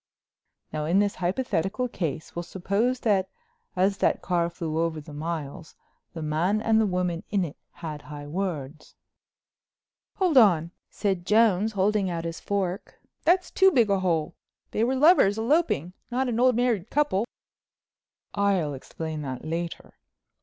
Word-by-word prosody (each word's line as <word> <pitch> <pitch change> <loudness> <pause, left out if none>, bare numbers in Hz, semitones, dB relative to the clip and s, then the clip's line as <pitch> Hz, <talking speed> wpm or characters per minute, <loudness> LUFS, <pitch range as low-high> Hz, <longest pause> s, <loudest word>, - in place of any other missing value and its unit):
"Now 155 -1 -2
in 170 +5 +2
this 205 0 +2
hypothetical 195 +3 -1
case 160 - -4
we'll 170 - -2
suppose 200 +8 -1
that 195 -4 +2 0.5
as 195 +2 +2
that - - +2
car 170 -2 +1
flew 165 -2 -3
over 165 -1 0
the 150 0 -11
miles 155 0 -5 0.4
the 160 - -4
man 165 +7 +1
and 220 0 +3
the 215 - +2
woman 180 -2 -1
in 195 -3 +1
it 150 - -8 0.2
had 155 -3 -7
high 145 -1 -9
words?" 155 -3 -5 1.2
"Hold 360 -8 +4
on," 170 -7 +4 0.2
said 195 -4 -1
Jones, 215 -1 +3
holding 200 0 +1
out 170 -1 -3
his 165 0 -4
fork—"that's 200 - -1
too 385 0 +5
big 235 - +3
a 195 - +3
hole. 165 -5 0 0.4
They 220 - 0
were 255 +3 +1
lovers 265 - +5
eloping, 225 - +1 0.2
not 255 +2 0
an 235 -2 -1
old 250 -1 +4
married 235 -5 0
couple." 240 -7 +1 1.1
"I'll 195 -7 +1
explain 155 +3 -6
that 130 -1 -6
later. 165 +1 -5
185 Hz, 145 wpm, -26 LUFS, 165-220 Hz, 1.2 s, too